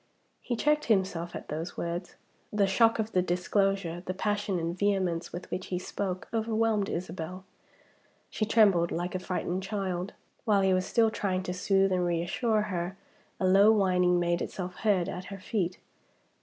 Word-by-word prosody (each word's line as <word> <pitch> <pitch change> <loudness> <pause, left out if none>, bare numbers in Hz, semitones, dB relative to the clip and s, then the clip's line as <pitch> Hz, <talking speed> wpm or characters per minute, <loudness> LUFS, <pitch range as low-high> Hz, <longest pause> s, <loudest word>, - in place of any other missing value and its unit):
He 240 - -2
checked 300 +5 +2
himself 190 -5 0
at - - -8
those 160 +3 -4
words. 170 +1 -4 0.4
The 210 -1 +3
shock 225 +4 +4
of 220 0 -2
the 185 - +3
disclosure, 180 0 0
the 185 0 -4
passion 205 -1 -1
and 170 0 -2
vehemence 185 -4 0
with 175 - -8
which 185 - -3
he 180 - -2
spoke, 185 0 -4
overwhelmed 220 -2 +1
Isabel. 180 +1 -5 0.9
She - - -2
trembled 205 -6 +4
like 175 +2 -2
a 185 - -1
frightened 185 0 -2
child. 190 -2 -3 0.3
While 205 -3 +3
he 190 -1 +3
was 185 0 +1
still 225 -1 +3
trying 190 -4 -1
to 180 - -3
soothe 195 +1 +2
and 180 -1 +1
reassure 175 +6 +1
her, 185 -2 -3 0.4
a 190 - +1
low 195 +3 +6
whining 180 -4 +3
made 175 0 +1
itself 180 -1 -5
heard 200 -6 +2
at 180 +1 -5
her 195 0 -7
feet. 185 -2 -2
185 Hz, 170 wpm, -29 LUFS, 180-205 Hz, 0.9 s, low